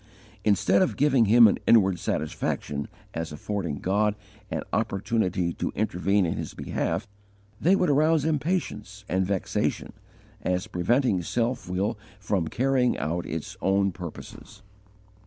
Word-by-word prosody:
Instead 100 -1 +3
of 100 - +1
giving 135 -5 +4
him 115 +2 +8
an 100 - +1
inward 95 -6 +5
satisfaction 75 -1 -2 0.3
as 80 -1 -4
affording 85 +1 -3
God 105 +4 +1 0.3
an - - -3
opportunity 100 -5 0
to - - -3
intervene 100 -1 +1
in 80 - -1
his - - -5
behalf, - - -2 0.5
they 185 +4 +5
would 185 -2 +2
arouse 155 +1 +3
impatience 150 - -2
and 95 0 0
vexation, 100 -2 -1 0.5
as 90 0 -1
preventing 100 +2 +1
self 120 +3 -2
will 100 +4 -1 0.2
from 100 -5 -1
carrying 130 +2 +1
out 85 +3 -2
its 80 -1 -5
own 100 0 +2
purposes. 85 -3 -10
100 Hz, 130 wpm, -26 LUFS, 90-120 Hz, 0.5 s, him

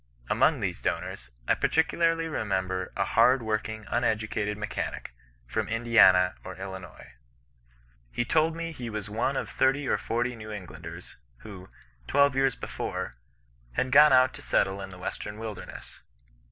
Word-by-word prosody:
Among - - +3
these - - -2
donors, 60 - -3 0.2
I - - +5
particularly 165 0 +1
remember 95 - -2
a 100 - +1
hard 120 +4 +4
working, 110 0 -3
uneducated 110 -2 -1
mechanic, 105 -10 -4 0.3
from - - -2
Indiana 110 -6 +5
or 95 - -7
Illinois. 95 -8 -9 1.0
He 120 - -1
told 160 +4 +2
me 165 0 -4
he 125 -7 -6
was 105 -1 -5
one 120 +5 0
of - - -2
thirty 135 +1 +1
or - - +1
forty 120 +2 -1
New 110 -1 -9
Englanders, 105 -4 -9 0.2
who, 95 -3 -10 0.4
twelve 140 -1 +4
years 135 0 +2
before, - - -5 0.6
had 130 - -1
gone 150 +2 +8
out 130 0 +5
to 145 - -9
settle 95 -7 +1
in 95 - -6
the 95 - -11
western 105 +3 -5
wUdemess. 110 -3 -8
110 Hz, 145 wpm, -28 LUFS, 95-130 Hz, 1.0 s, gone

